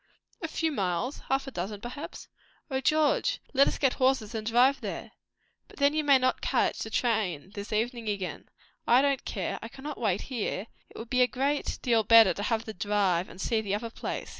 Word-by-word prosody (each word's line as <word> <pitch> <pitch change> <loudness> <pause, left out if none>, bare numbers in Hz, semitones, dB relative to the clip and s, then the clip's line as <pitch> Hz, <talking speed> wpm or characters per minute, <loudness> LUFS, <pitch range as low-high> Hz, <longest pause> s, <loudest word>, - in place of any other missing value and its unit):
"A 325 - -2
few 320 0 -1
miles 200 - -2
half 270 0 +1
a 270 - -7
dozen, 200 0 -4
perhaps." 245 +7 -8 0.4
"O 265 0 0
George, 305 +2 +2
let 275 0 +5
us - - -1
get 270 -3 +2
horses 255 -5 +1
and 220 -1 -4
drive 250 +4 +4
there!" - - -5 0.6
"But - - -17
then 280 0 +3
you 310 0 0
may 280 -2 +6
not 255 0 0
catch - - +1
the 220 - -4
train 210 - -1
this 205 0 -7
evening 230 +1 -1
again." 195 -3 -4 0.4
"I 250 +3 +6
don't 280 -2 +1
care. 190 -5 -3
I - - -6
cannot 275 +5 -8
wait 205 -5 0
here. 230 -5 -3 0.2
It - - -14
would 225 - -8
be 255 -1 +3
a 250 - +6
great 275 +4 -1
deal 235 -3 +3
better 225 -3 +7
to 200 - -6
have 225 +1 -1
the 220 - -6
drive 190 -2 0
and 185 - -13
see 220 +2 0
the 200 -2 -1
other 225 +2 -5
place. - - -5
230 Hz, 210 wpm, -28 LUFS, 205-270 Hz, 0.6 s, better